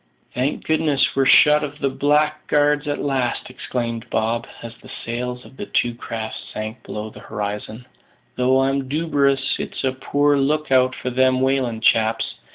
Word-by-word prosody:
"Thank 130 +4 -1
goodness, 155 -3 +2
we're 135 -1 +3
shut 150 0 +6
of 145 0 -5
the 140 -2 -1
blackguards 150 +1 +1
at 145 - -1
last!" 130 -3 -1
exclaimed 120 -3 -4
Bob, 115 +2 -1 0.2
as 115 -1 -7
the - - -14 0.2
sails 125 +1 -4
of 130 - -16
the - - -6
two 120 -1 +1
craft 115 -2 -5
sank 110 +2 -6
below 105 +1 -6
the - - -12
horizon; 105 +3 -5 0.5
"though 130 +1 +3
I'm 135 0 0
duberous 140 -3 +1
it's - - -5
a 130 - +2
poor 145 +2 +1
look 150 +1 0
out 130 0 +4
for 125 - -4
them 130 0 +3
whalin' 130 -4 0
chaps. 110 0 +2
130 Hz, 165 wpm, -21 LUFS, 120-145 Hz, 0.5 s, shut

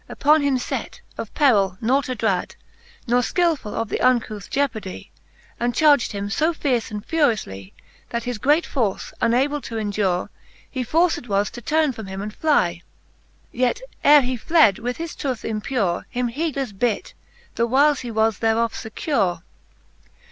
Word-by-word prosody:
Upon 305 +1 +3
him 280 -2 +2
fet, 250 - -4 0.2
of - - -6
perill 200 -10 +3
nought 260 +4 +1
adrad, 220 -7 -1 0.5
•Ne 240 +1 +3
fkilfull 320 - 0
of 225 -1 -2
the - - -2
uncouth 230 -5 +1
jeopardy; 230 -9 -3 0.5
And 240 0 -1
charged 290 -4 +4
him 200 -1 -4
fo 310 +11 +1
fierce 255 -7 -1
and 210 -2 -7
furioufly, 215 - 0 0.4
That 235 -1 -3
his 245 -3 -4
great 295 +8 +3
force 220 -8 -2
unable 275 +5 +2
to 230 - -6
endure. 205 -4 -1 0.4
He 260 -2 -4
forced 325 0 +1
was 200 0 0
to 240 - -9
turne 310 +3 +1
from 220 -5 -8
him 190 0 -6
and 210 +1 -5
fly: 180 - +1 0.7
Yet 250 - 0 0.2
ere 295 0 +8
he 255 -1 -2
fled, 270 - +4
he - - -13
with 245 +1 -3
his 330 -1 -5
tooth 255 -6 -3
impure 215 -4 -1
Him 245 -1 -1
heedleffe 275 -7 -3
bit, 235 -4 -1 0.4
the 235 - 0
whiles 280 +4 +3
he 245 - -6
was 220 -2 +1
thereof 225 0 +1
fecure. 205 - -2
240 Hz, 160 wpm, -22 LUFS, 210-280 Hz, 0.7 s, ere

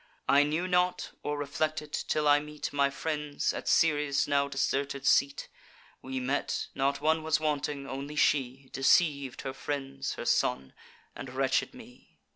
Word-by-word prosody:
I 140 - +6
knew 155 +5 0
not, 180 0 +1
or 145 0 -2
reflected, 150 +1 -2
till 150 -1 0
I 145 0 +6
meet 150 0 -6
My 140 -1 +3
friends, 150 0 -2
at - - -6
Ceres' 150 -3 +3
now 140 -1 +2
deserted 140 0 -1
seat. 140 +1 +2 0.5
We 130 0 -4
met: 130 +3 -2
not 140 +1 0
one 160 +1 +2
was 155 -1 +1
wanting; 145 -2 -2
only 140 +3 -6
she 135 -2 +1
Deceiv'd 140 -1 +2
her 135 -1 -4
friends, 135 -1 -4
her - - -6
son, 65 0 +1 0.4
and 135 - -7
wretched 135 - 0
me. 245 0 -16
145 Hz, 150 wpm, -29 LUFS, 135-150 Hz, 0.5 s, I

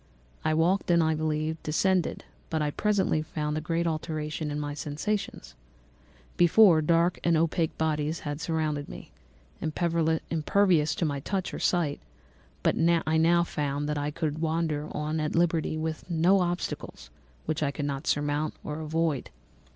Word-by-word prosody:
I 155 - +1
walked 175 +5 +2
and, 170 -1 +5
I 160 0 +2
believe, 155 0 -1
descended, 180 +3 0 0.2
but 160 - -1
I 150 -1 0
presently 195 -4 +1
found 150 -1 -3
a 155 - -2
great 165 +2 -1
alteration 155 -1 -3
in 145 0 -3
my 145 -1 -3
sensations. 150 - -3 0.8
Before, 175 -1 +6
dark 170 +3 +2
and 170 -1 +3
opaque 165 0 0
bodies 155 0 -1
had 145 +1 -4
surrounded 155 -3 -1
me, - - -10 0.5
impervious 160 +1 +1
to 170 - 0
my 145 -2 -1
touch 190 +6 -3
or - - -4
sight; 165 -5 +1 0.6
but - - +3 0.3
I 160 0 +2
now 170 +2 +4
found 145 -3 -2
that 150 -1 -1
I 145 0 -1
could 150 0 -3
wander 160 -2 -1
on 150 +1 -2
at 155 0 -2
liberty, 165 -2 +1
with 160 +2 -4
no 175 +4 +4
obstacles 175 - -3 0.3
which 155 -1 -2
I 145 - +2
could 145 +1 -4
not 140 -1 -1
either 135 - -11
surmount 145 +1 0
or 150 +1 -5
avoid. 160 -2 -1
155 Hz, 160 wpm, -28 LUFS, 150-170 Hz, 0.8 s, Before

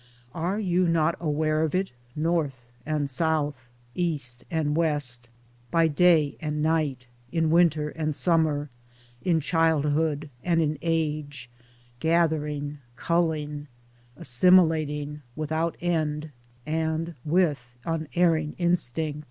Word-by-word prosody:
Are 175 +6 -1
you 180 -3 +2
not 165 0 +2
aware 155 -1 0
of 160 +1 0
it 190 +1 0 0.2
North 150 -7 -1 0.2
and 150 -2 0
South, 145 -3 -1 0.2
East 140 -8 -2
and 155 -4 0
West, 145 -7 0 0.4
by 165 +4 +3
day 160 -2 +3
and 150 -1 -2
night, 155 -5 0 0.3
in 165 -2 +1
winter 160 -3 +3
and 155 -1 -3
summer, 150 -1 +1 0.5
in 170 -3 +2
childhood 155 -1 +1
and 170 -2 +2
in 155 -2 0
age, 150 -6 -2 0.5
gathering, 150 -2 0 0.2
culling, 150 -2 -1 0.5
assimilating, 150 0 +3
without 160 +2 -1
end, 155 -3 -1 0.3
and 160 +2 -1
with 150 -7 0
unerring 160 -1 +1
instinct? 160 -4 0
155 Hz, 105 wpm, -26 LUFS, 145-165 Hz, 0.5 s, by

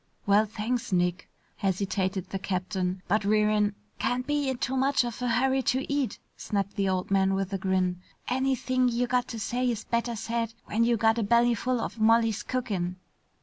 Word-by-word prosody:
"Well, 205 +2 +4
thanks, 225 +3 -3
Nick," 180 -1 0 0.3
hesitated 190 -1 -1
the 195 - -2
captain. 185 -1 -2
"But 210 +3 +2
we're 210 +1 +3
in 210 -1 +1
" - - -38
"Can't 250 +1 0
be 290 -1 0
in 260 - -2
too 260 +2 -2
much 270 0 +3
of 240 0 -5
a 250 - 0
hurry 260 +3 +2
to 260 +2 0
eat," 285 -3 -1 0.2
snapped 200 -1 -2
the 195 -2 +1
old 185 0 -1
man 195 0 +3
with 195 0 -2
a 195 - -1
grin. 185 -1 0 0.3
"Anything 255 0 +1
you 240 +1 0
got 250 0 0
to 230 - -6
say 245 +3 0
is 230 -3 -2
better 235 0 -1
said 230 0 -3
when 225 +2 +1
you 235 0 +3
got 225 +1 +3
a - - +1
bellyful 235 +2 +2
of 230 - -4
Molly's 225 0 +3
cookin'." 195 -8 -2
225 Hz, 190 wpm, -28 LUFS, 195-245 Hz, 0.3 s, Well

